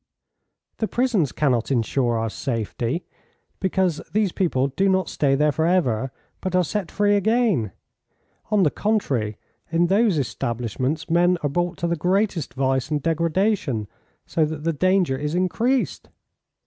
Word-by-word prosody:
"The 220 - -1
prisons 230 - +1
cannot 125 -6 +1
insure 120 -1 +1
our 115 0 -2
safety, 120 - -3 0.5
because 190 -4 0
these 210 -3 +1
people 140 -9 0
do 195 +8 +1
not 190 -3 +1
stay 135 -2 +1
there 150 +2 +3
for 160 +3 0
ever, 130 -9 +1 0.3
but 185 -1 -2
are 180 - +4
set 195 +3 -3
free 205 0 +2
again. 205 - +2 0.8
On 210 -2 +3
the 150 - +3
contrary, 130 - -1 0.3
in 165 +1 +3
those 200 0 +3
establishments 125 +4 -2
men 175 +2 +3
are 145 - +1
brought 175 +3 -1
to 170 - -1
the 170 - 0
greatest 180 -1 0
vice 130 0 0
and 150 -1 0
degradation, 165 - 0 0.4
so 160 - +1
that 155 -1 -3
the 165 0 0
danger 185 -3 +2
is 150 +3 -3
increased." 230 +8 0
165 Hz, 150 wpm, -23 LUFS, 135-190 Hz, 0.8 s, are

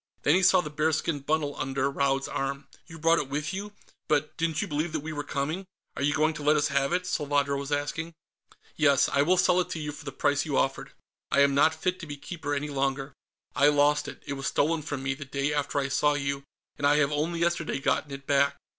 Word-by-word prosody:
Then 145 - +4
he 185 - +4
saw 185 0 +5
the 150 - -7
bearskin 155 0 0
bundle 145 0 -1
under 135 0 0
Raud's 135 -1 0
arm. 140 0 -3 0.2
"You 165 - -10
brought 165 +1 +3
it 135 - -4
with 150 +5 -2
you? 205 +2 -5 0.3
But 150 0 0
didn't 160 -1 -1
you - - -1
believe 155 +2 -2
that 155 - -1
we 160 +1 -5
were 145 -1 -3
coming?" 155 +7 -3 0.3
"Are - - -5
you 145 +1 +2
going 155 +1 +2
to 150 - -7
let 150 +1 +4
us 145 - +1
have 135 - +1
it?" 180 +1 0
Salvadro 145 -4 0
was 140 +1 -4
asking. 160 +3 -2 0.6
"Yes; 140 -3 +4
I 140 - +2
will 180 +6 +3
sell 180 0 +4
it 180 - -1
to 160 - -4
you, 150 -1 -4
for 150 - -11
the 145 - -5
price 145 +1 +1
you 150 -4 -1
offered. 135 0 -1 0.4
I 140 - +3
am 140 0 +4
not 155 +3 +4
fit 180 +3 -2
to 170 - -8
be 145 -1 -6
Keeper 145 -1 -4
any 150 +1 -3
longer. 135 0 -2 0.4
I 145 - +5
lost 145 0 +3
it. - - -9
It 140 - -3
was 135 0 -4
stolen 160 +2 +1
from 145 -2 -5
me, 140 +1 0
the 140 - -8
day 140 +1 -2
after 145 -1 -1
I 140 -1 +1
saw 145 +2 +2
you, 140 -1 -2 0.3
and 145 - +3
I 145 - +5
have 150 -1 +2
only 160 +3 -1
yesterday 170 -3 0
gotten 135 +2 0
it 140 0 -8
back. 140 0 +2
145 Hz, 245 wpm, -27 LUFS, 140-160 Hz, 0.6 s, saw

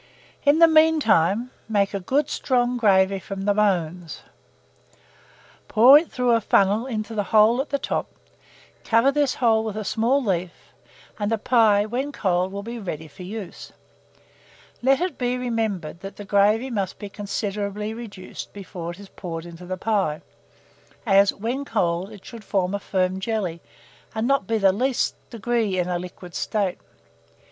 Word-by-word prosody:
In 285 +2 +5
the 335 0 +8
mean 320 0 +5
time, 215 - +2 0.2
make 200 -2 +1
a 200 - -1
good 270 +10 0
strong 245 -1 0
gravy 195 -4 +3
from 195 0 -6
the 205 +1 +2
bones, 180 -5 -1 1.4
pour 240 +5 +7
it 330 - -8
through 250 -1 +1
a 230 -1 +3
funnel 205 +4 +2
into 220 -2 -4
the 205 -2 -1
hole 220 +5 +4
at 285 - -7
the 280 - 0
top; - - -2 0.8
cover 230 +4 +3
this 285 -2 +1
hole 225 -3 +2
with 215 -1 -4
a 215 - -3
small 240 +7 +1
leaf, 180 -4 -3 0.5
and 205 +1 -1
the 225 - +2
pie, 215 -3 +3
when 255 +6 -3
cold, 185 -6 0
will 200 +1 -5
be 235 +2 -6
ready 160 -6 -6
for 145 +3 -14
use. 195 0 -8 1.1
Let 270 +4 +3
it 360 -1 -2
be 250 0 0
remembered 220 -10 -2
that 195 +2 -8
the 205 - -9
gravy 210 +6 +2
must 200 -5 -2
be 205 - -7
considerably 205 +1 -4
reduced 210 -5 -9
before 180 -4 -7
it 175 +2 -8
is 200 -1 -12
poured 165 -2 -7
into 175 +1 -11
the 185 0 -3
pie, 190 -7 -1 0.8
as, 200 -2 +5
when 240 +7 -3
cold, 175 -7 -1
it 205 -3 -13
should 230 -2 -10
form 190 -2 -1
a 200 - -1
firm 185 -1 -1
jelly, 190 -5 -3 0.5
and 220 +1 -1
not 275 -8 +1
be 225 - +1
the 195 -3 +4
least 255 +5 0 0.2
degree 230 -3 -1
in 180 -1 0
a 180 -1 -1
liquid 180 0 -10
state. 200 -2 -1
210 Hz, 170 wpm, -23 LUFS, 190-235 Hz, 1.4 s, the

